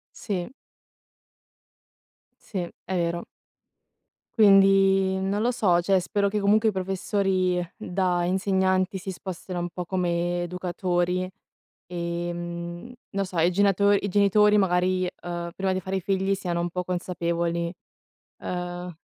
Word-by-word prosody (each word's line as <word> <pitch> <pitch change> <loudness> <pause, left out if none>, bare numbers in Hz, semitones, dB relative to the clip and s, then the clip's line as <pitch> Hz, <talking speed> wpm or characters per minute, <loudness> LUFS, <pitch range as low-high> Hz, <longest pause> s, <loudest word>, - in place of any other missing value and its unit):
Sì. 190 -1 -4 1.9
Sì, 200 - -7 0.3
è 190 - -3
vero. 170 0 -1 1.2
Quindi, 195 -2 +5
non 195 +2 -1
lo 240 +2 +2
so, 185 -8 +2
cioè, 190 +1 +3
spero 200 +2 0
che 210 +1 -1
comunque 215 +2 +4
i - - 0
professori 190 -1 0
da 180 -1 0
insegnanti 190 +1 +1
si 190 +1 -5
spostino 185 -1 -6
un 175 0 -3
po' 180 +2 -5
come 175 -1 -1
educatori, 180 0 -1 0.6
ehm, 175 +3 -5 0.2
non 195 -1 -1
so, 180 -2 -7
i 170 +2 +4
genato 200 +1 +3
i 200 0 +2
genitori 205 +2 +4
magari, 185 -1 +2 0.2
uhm, 175 -1 -4
prima 190 -1 0
di 185 - -2
fare 190 +1 -2
i - - -3
figli 195 +1 0
siano 175 -3 -2
un 175 - -1
po' 180 +1 -3
consapevoli, 170 -1 -2 0.7
uhm, 180 0 -4
185 Hz, 130 wpm, -25 LUFS, 175-195 Hz, 1.9 s, Quindi